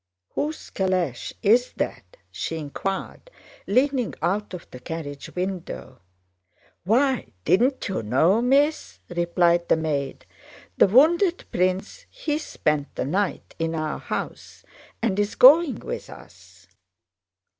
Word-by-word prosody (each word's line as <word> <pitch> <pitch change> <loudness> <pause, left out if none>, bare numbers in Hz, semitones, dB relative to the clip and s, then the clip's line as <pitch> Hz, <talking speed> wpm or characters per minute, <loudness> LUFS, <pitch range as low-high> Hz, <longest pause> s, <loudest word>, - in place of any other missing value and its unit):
"Whose 305 +2 -3
calèche 185 -9 -1
is 235 +4 +4
that?" - - -5
she 165 - -4
inquired, 190 - -5 0.4
leaning 255 +1 +1
out 205 +3 -1
of 175 - -10
the 125 - -9
carriage 145 -1 -6
window. 180 - -5 0.9
"Why, 260 +6 +2 0.2
didn't 245 - +2
you 195 - -2
know, 155 - +3
Miss?" 285 +5 +2
replied 175 0 +2
the - - +4
maid. 145 -4 -3 0.5
"The - - +5
wounded 335 - +4
prince: 185 - -1
he 310 -12 -2
spent 150 - -2
the - - -2
night 190 +7 -2
in 165 0 -1
our 155 -1 -2
house - - -6 0.4
and 205 -4 +1
is 205 0 0
going 295 +3 +7
with - - -6
us." - - -15
190 Hz, 120 wpm, -24 LUFS, 165-260 Hz, 0.9 s, going